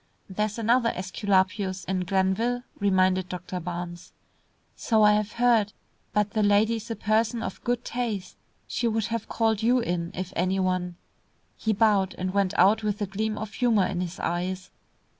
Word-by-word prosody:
"There 210 +2 -1
is 210 - -8
another 230 +1 +3
Esculapius 190 0 0
in 185 -1 -1
Glenville," 195 +6 +1 0.2
reminded 185 -2 +2
Doctor 180 0 -5
Barnes. 175 +1 -6 0.6
"So 220 -2 +2
I 210 0 +7
have 210 0 0
heard; 230 -4 +3 0.4
but 210 -1 +1
the 220 - 0
lady 210 +2 +3
is 225 +2 -9
a 230 - -2
person 220 +2 0
of - - -6
good 245 0 -1
taste. 225 -6 -3 0.3
She 240 - -1
would 225 -2 0
have 230 -2 -3
called 225 -2 +1
you 240 +3 +3
in 175 -6 -2
if 185 -1 -5
any 185 +2 +1
one." 185 -1 -1 0.6
He 220 - -1
bowed 205 -3 +2
and 185 0 -3
went 200 -2 +1
out 215 +3 +5
with 210 -1 -2
a 205 - 0
gleam 215 +3 -2
of 215 -1 -6
humour 225 -6 +2
in 180 -2 -2
his 175 -1 -5
eyes. 180 +2 -3
205 Hz, 175 wpm, -26 LUFS, 185-220 Hz, 0.6 s, I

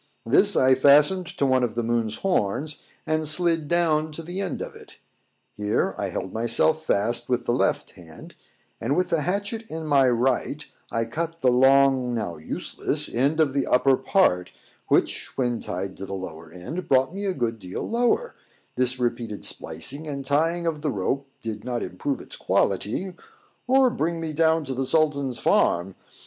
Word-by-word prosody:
This - - +4
I 130 0 +5
fastened 150 +7 +5
to 140 - -2
one 130 -1 +3
of 120 -3 -1
the 120 - -1
moon's 115 -2 -1
horns, 150 - 0 0.2
and 155 0 0
slid 165 0 +2
down 155 -2 +1
to 165 - -7
the 180 +4 -5
end 190 - -3
of - - -6
it. - - -14 0.6
Here 105 0 -1
I - - -3
held 95 - -5
myself 120 +8 +2
fast 120 -1 0
with 125 -1 0
the - - +1
left 120 - 0
hand, 80 -3 -13 0.5
and 130 +6 -1
with 180 0 0
the 165 - +2
hatchet 200 +7 -2
in 160 0 -5
my 140 -3 +4
right, 130 +4 0 0.3
I 115 0 0
cut 165 +7 -4
the 130 - +4
long, 130 -1 +4
now 105 -7 -3
useless 80 - -2
end 140 +6 +1
of 150 -4 +3
the 140 -1 0
upper 130 +1 +4
part, 90 - +1 0.4
which, - - +1
when 120 -3 0
tied 95 +2 -5
to 95 - -7
the 95 - -5
lower 80 -4 -8
end, 90 - -6
brought 130 +3 +3
me 200 +1 -4
a 190 - 0
good 115 -3 -2
deal 90 -2 -6
lower: 245 - 0 0.4
this 125 0 0
repeated 120 -3 -2
splicing 150 +4 -1
and 140 -2 -5
tying 165 +5 +1
of 160 -3 -2
the 150 - -1
rope 135 +5 -2 0.2
did 110 -2 -5
not 120 -1 -3
improve 135 +10 -3
its - - -8
quality, 180 - 0 0.5
or 260 0 +4
bring 170 -8 -2
me 160 -1 -4
down 160 0 +2
to 135 - -4
the 130 +1 -2
Sultan's 140 -5 +1
farm. 90 +3 +2
135 Hz, 180 wpm, -24 LUFS, 115-160 Hz, 0.6 s, I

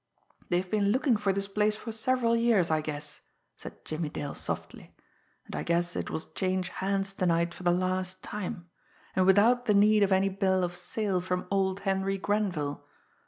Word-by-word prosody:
"They've 180 +1 +1
been 205 +1 +1
looking 255 +2 +3
for 205 -2 +1
this 195 +1 -2
place 210 +1 +1
for 225 +2 -7
several 230 +1 +1
years, 230 -8 +3
I 155 0 +2
guess," 150 -1 -6 0.3
said - - -11
Jimmie 155 0 -3
Dale 145 -1 -5
softly. - - -5 0.5
"And - - -8
I - - -2
guess 175 +1 0
it - - -3
will 160 - -3
change 185 -1 -1
hands 195 0 -1
to 185 -2 -1
night 170 0 +1
for - - -12
the 180 - +2
last 185 +1 -1
time 195 -3 -5 0.5
and 185 0 +3
without 230 +6 +5
the 210 - +4
need 210 +1 +5
of 200 -1 +3
any 190 +1 +3
Bill 190 -1 +1
of 175 0 -2
Sale 185 +1 -2
from 180 0 -2
old 195 0 +1
Henry 195 0 0
Grenville! 185 -8 -1
190 Hz, 185 wpm, -29 LUFS, 175-210 Hz, 0.5 s, without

